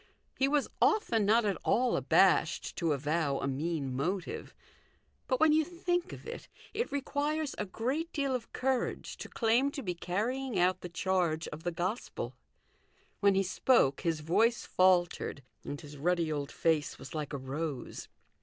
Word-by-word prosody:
He 270 Hz, -, +2 dB
was 290 Hz, 0 st, +2 dB
often 230 Hz, -, +3 dB
not 225 Hz, +2 st, +4 dB
at 200 Hz, -2 st, +1 dB
all 250 Hz, +1 st, +2 dB
abashed -, -, +3 dB
to 165 Hz, -3 st, +1 dB
avow 145 Hz, 0 st, 0 dB
a -, -, -2 dB
mean 140 Hz, -1 st, -2 dB
motive; 175 Hz, +7 st, -3 dB, 0.7 s
but 255 Hz, -, +1 dB
when 315 Hz, 0 st, +6 dB
you 315 Hz, +1 st, +4 dB
think 350 Hz, +1 st, -2 dB
of -, -, -10 dB
it, 470 Hz, +1 st, -7 dB, 0.3 s
it 465 Hz, +3 st, -2 dB
requires 290 Hz, +2 st, -1 dB
a -, -, -2 dB
great 265 Hz, -, -2 dB
deal 280 Hz, -3 st, 0 dB
of 245 Hz, -3 st, -4 dB
courage 260 Hz, -1 st, -1 dB
to -, -, -8 dB
claim 240 Hz, +4 st, +2 dB
to 280 Hz, -1 st, -6 dB
be 180 Hz, -4 st, -1 dB
carrying 220 Hz, +8 st, -2 dB
out 185 Hz, +1 st, +2 dB
the 180 Hz, -, -6 dB
charge 175 Hz, -2 st, 0 dB
of 150 Hz, -, -8 dB
the 175 Hz, -, -2 dB
Gospel. 185 Hz, +7 st, -3 dB, 0.9 s
When 200 Hz, -1 st, +4 dB
he 195 Hz, -, +3 dB
spoke 185 Hz, -, +3 dB
his 165 Hz, -2 st, 0 dB
voice 220 Hz, +9 st, +2 dB
faltered, 175 Hz, -6 st, +2 dB, 0.2 s
and 145 Hz, -, -5 dB
his 145 Hz, 0 st, -11 dB
ruddy 170 Hz, +1 st, +1 dB
old 145 Hz, -2 st, -3 dB
face 155 Hz, -3 st, +1 dB
was 135 Hz, -, -10 dB
like 150 Hz, -2 st, -3 dB
a 145 Hz, -, -2 dB
rose. 135 Hz, 0 st, -5 dB
185 Hz, 165 wpm, -31 LUFS, 160-260 Hz, 0.9 s, when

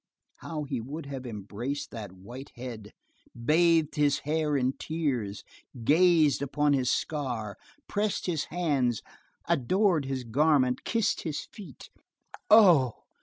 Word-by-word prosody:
How 155 Hz, -2 st, -5 dB
he 135 Hz, -4 st, -3 dB
would 145 Hz, +6 st, -7 dB
have 135 Hz, -2 st, -6 dB
embraced 115 Hz, +6 st, -5 dB
that 105 Hz, -5 st, -7 dB
white 120 Hz, +9 st, -10 dB
head, 115 Hz, -4 st, -8 dB, 0.5 s
bathed 160 Hz, 0 st, +3 dB
his 145 Hz, -1 st, +2 dB
hair 150 Hz, -1 st, +1 dB
in 130 Hz, 0 st, +1 dB
tears, 130 Hz, -11 st, -2 dB, 0.4 s
gazed 160 Hz, 0 st, +4 dB
upon 145 Hz, +1 st, +1 dB
his 130 Hz, -2 st, +1 dB
scar, 120 Hz, -9 st, -2 dB, 0.3 s
pressed 205 Hz, 0 st, -1 dB
his 165 Hz, -5 st, -1 dB
hands, 140 Hz, -, 0 dB, 0.4 s
adored 170 Hz, -, +2 dB
his 135 Hz, -1 st, -3 dB
garment, 130 Hz, +1 st, +2 dB
kissed 230 Hz, -2 st, 0 dB
his 155 Hz, -4 st, -4 dB
feet! 185 Hz, -, -12 dB, 0.6 s
Oh! 175 Hz, -, +7 dB
140 Hz, 120 wpm, -28 LUFS, 125-160 Hz, 0.6 s, Oh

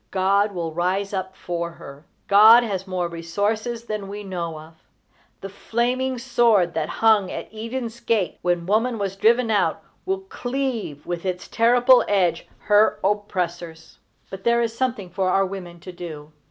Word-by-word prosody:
God 200 Hz, +2 st, +2 dB
will 170 Hz, -4 st, -4 dB
rise 185 Hz, +4 st, -1 dB
up 190 Hz, -1 st, -4 dB
for 170 Hz, -1 st, -4 dB
her. 140 Hz, -1 st, -13 dB, 0.2 s
God 220 Hz, +4 st, +8 dB
has 195 Hz, -4 st, -4 dB
more 180 Hz, -2 st, -2 dB
resources 205 Hz, +8 st, -2 dB
than 215 Hz, -3 st, -5 dB
we 205 Hz, +1 st, -7 dB
know 170 Hz, -4 st, -4 dB
of. 160 Hz, +1 st, -13 dB, 0.7 s
The 195 Hz, -, -6 dB
flaming 250 Hz, +5 st, -1 dB
sword 235 Hz, -8 st, +2 dB
that 155 Hz, -1 st, -2 dB
hung 220 Hz, -4 st, +3 dB
at -, -, -7 dB
Eden's 230 Hz, +1 st, -5 dB
gate 225 Hz, -5 st, -1 dB
when 175 Hz, -1 st, 0 dB
woman 225 Hz, +5 st, +1 dB
was 195 Hz, -2 st, -3 dB
driven 230 Hz, +3 st, +3 dB
out 205 Hz, -, +1 dB, 0.2 s
will 385 Hz, 0 st, -1 dB
cleave 245 Hz, -, -4 dB
with 175 Hz, -1 st, -4 dB
its 185 Hz, -1 st, -4 dB
terrible 245 Hz, +2 st, +4 dB
edge 180 Hz, -5 st, +1 dB
her 210 Hz, +1 st, +3 dB
oppressors. 175 Hz, -5 st, -3 dB, 0.3 s
But 195 Hz, -, -8 dB
there 235 Hz, 0 st, +3 dB
is 230 Hz, -1 st, -3 dB
something 235 Hz, -7 st, -2 dB
for 185 Hz, +1 st, 0 dB
our 195 Hz, +1 st, +3 dB
women 180 Hz, -3 st, -8 dB
to 185 Hz, -, -9 dB
do. 160 Hz, -4 st, -9 dB
200 Hz, 160 wpm, -23 LUFS, 175-230 Hz, 0.7 s, God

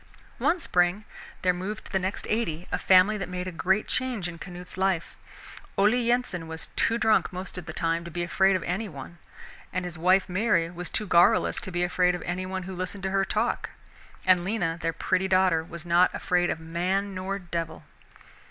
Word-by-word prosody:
One 360 Hz, -, +2 dB
spring 180 Hz, -, +1 dB, 0.4 s
there 180 Hz, -1 st, +4 dB
moved 190 Hz, +4 st, -5 dB
to -, -, -12 dB
the 190 Hz, -, +1 dB
next 190 Hz, +2 st, -3 dB
"eighty" 180 Hz, -7 st, -1 dB
a -, -, 0 dB
family 195 Hz, +3 st, +5 dB
that 195 Hz, -, -4 dB
made 180 Hz, 0 st, -4 dB
a -, -, -3 dB
great 190 Hz, +5 st, +1 dB
change 250 Hz, -8 st, -1 dB
in 170 Hz, -1 st, -8 dB
Canute's 180 Hz, +1 st, -8 dB
life. 190 Hz, -3 st, 0 dB, 0.6 s
Ole 205 Hz, +3 st, +5 dB
Yensen 240 Hz, -8 st, 0 dB
was 160 Hz, 0 st, -5 dB
too 230 Hz, -, +2 dB
drunk 220 Hz, -2 st, +3 dB
most 185 Hz, +1 st, -6 dB
of 180 Hz, -3 st, -7 dB
the -, -, -4 dB
time 165 Hz, 0 st, -1 dB
to -, -, -6 dB
be 175 Hz, +1 st, -3 dB
afraid 190 Hz, +4 st, +3 dB
of 185 Hz, -, -1 dB
any 195 Hz, +4 st, -2 dB
one, 155 Hz, +3 st, -10 dB, 0.5 s
and 185 Hz, 0 st, -2 dB
his 175 Hz, -2 st, -6 dB
wife 185 Hz, +3 st, +4 dB
Mary 185 Hz, -3 st, +1 dB
was 175 Hz, 0 st, -6 dB
too 215 Hz, -, 0 dB
garrulous 175 Hz, -3 st, +4 dB
to 190 Hz, -, -6 dB
be 175 Hz, 0 st, 0 dB
afraid 180 Hz, 0 st, +2 dB
of 175 Hz, -, -6 dB
any 185 Hz, +1 st, -3 dB
one 190 Hz, 0 st, -4 dB
who 190 Hz, +1 st, -6 dB
listened 185 Hz, +2 st, -5 dB
to 190 Hz, -, -1 dB
her 195 Hz, 0 st, +2 dB
talk, 215 Hz, +4 st, -1 dB, 0.6 s
and 185 Hz, -2 st, +5 dB
Lena, 180 Hz, -4 st, -1 dB
their 165 Hz, -, 0 dB
pretty 185 Hz, +3 st, 0 dB
daughter, 185 Hz, -3 st, +3 dB
was 170 Hz, 0 st, -10 dB
not 175 Hz, +1 st, +5 dB
afraid 180 Hz, -1 st, +1 dB
of -, -, -2 dB
man 180 Hz, +5 st, -1 dB
nor 190 Hz, +1 st, -3 dB
devil. 170 Hz, -3 st, -5 dB
185 Hz, 205 wpm, -27 LUFS, 175-195 Hz, 0.6 s, family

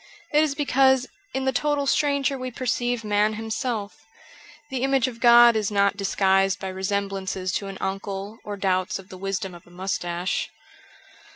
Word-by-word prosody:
It 300 Hz, -, +5 dB
is 290 Hz, -3 st, -1 dB
because 265 Hz, -2 st, +3 dB, 0.3 s
in 265 Hz, +1 st, -2 dB
the 265 Hz, -, +2 dB
total 290 Hz, +2 st, 0 dB
stranger 280 Hz, -1 st, +1 dB
we 255 Hz, -1 st, -4 dB
perceive 245 Hz, -1 st, -1 dB
man 210 Hz, 0 st, +2 dB
himself; 220 Hz, -1 st, -3 dB, 0.7 s
the 260 Hz, -2 st, -2 dB
image 270 Hz, -1 st, +2 dB
of 235 Hz, -2 st, -7 dB
God 240 Hz, -1 st, +7 dB
is 215 Hz, -2 st, 0 dB
not 200 Hz, -1 st, +2 dB
disguised 195 Hz, -1 st, +2 dB
by 190 Hz, -, -4 dB
resemblances 190 Hz, -1 st, -2 dB
to 200 Hz, -, -2 dB
an 195 Hz, -1 st, -7 dB
uncle 195 Hz, +2 st, -4 dB
or 205 Hz, -1 st, -6 dB
doubts 185 Hz, -1 st, 0 dB
of 195 Hz, 0 st, -13 dB
the 185 Hz, -, -9 dB
wisdom 195 Hz, -1 st, -3 dB
of 175 Hz, 0 st, -14 dB
a -, -, -17 dB
moustache. 175 Hz, 0 st, -2 dB
205 Hz, 165 wpm, -24 LUFS, 195-255 Hz, 0.7 s, God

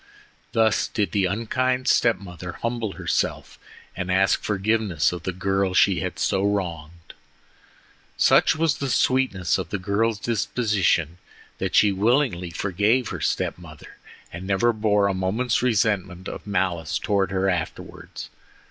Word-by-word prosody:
Thus 110 Hz, -1 st, +2 dB
did 105 Hz, -6 st, -2 dB
the 100 Hz, 0 st, +1 dB
unkind 125 Hz, +6 st, -1 dB
step 115 Hz, -2 st, +3 dB
mother 90 Hz, -2 st, -9 dB
humble 115 Hz, -2 st, -3 dB
herself -, -, -2 dB, 0.4 s
and 95 Hz, 0 st, -3 dB
ask 95 Hz, +1 st, +2 dB
forgiveness 105 Hz, -6 st, 0 dB
of 90 Hz, -1 st, -6 dB
the 95 Hz, -, -3 dB
girl 95 Hz, +1 st, -1 dB
she 95 Hz, -2 st, +4 dB
had 90 Hz, -1 st, -4 dB
so 95 Hz, -2 st, 0 dB
wronged. 85 Hz, -5 st, -3 dB, 1.0 s
Such 150 Hz, -, +4 dB
was 155 Hz, -2 st, +1 dB
the 140 Hz, -, -2 dB
sweetness 125 Hz, -10 st, +1 dB
of -, -, -5 dB
the 105 Hz, -, -2 dB
girl's 105 Hz, +4 st, 0 dB
disposition 100 Hz, -, 0 dB, 0.4 s
that -, -, -2 dB
she 105 Hz, -, +5 dB
willingly 105 Hz, -3 st, +1 dB
forgave 105 Hz, +7 st, 0 dB
her -, -, -6 dB
step -, -, -1 dB
mother, 80 Hz, -4 st, -13 dB, 0.4 s
and 90 Hz, +3 st, -7 dB
never 110 Hz, +5 st, +2 dB
bore 105 Hz, -2 st, +2 dB
a 100 Hz, -, +1 dB
moment's 105 Hz, +7 st, 0 dB
resentment 100 Hz, -6 st, 0 dB
or -, -, -6 dB
malice 90 Hz, -5 st, -1 dB
towards 100 Hz, -2 st, 0 dB
her 95 Hz, 0 st, 0 dB
afterwards. 90 Hz, -4 st, -5 dB
100 Hz, 140 wpm, -23 LUFS, 90-110 Hz, 1.0 s, she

